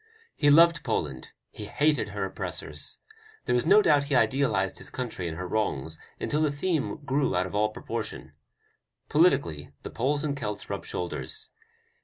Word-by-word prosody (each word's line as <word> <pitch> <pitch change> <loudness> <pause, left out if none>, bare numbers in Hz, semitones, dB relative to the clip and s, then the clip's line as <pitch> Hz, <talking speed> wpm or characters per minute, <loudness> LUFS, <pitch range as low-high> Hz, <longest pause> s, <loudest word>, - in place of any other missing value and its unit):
He 145 - +3
loved 165 +1 +6
Poland, 75 - -2 0.2
he - - -7
hated 150 0 +1
her - - -3
oppressors. - - -3 0.5
There - - +1
is 125 +5 +1
no 205 +4 +7
doubt 145 -2 +4
he 140 -1 0
idealized 115 -5 +2
his - - -6
country 115 -8 -4
and 80 -1 -5
her 90 0 -4
wrongs 80 -7 -2 0.2
until 150 - 0
the 155 -2 +2
theme 155 +1 -1
grew 135 -3 +1
out 90 +1 +2
of 95 - -7
all 105 +1 +2
proportion. 110 - -6 0.8
Politically 85 - +2
the - - -6
Poles 145 +6 0
and 145 -2 -1
Celts 105 -6 -5
rub - - -4
shoulders. 90 -1 -3
130 Hz, 165 wpm, -27 LUFS, 95-150 Hz, 0.8 s, no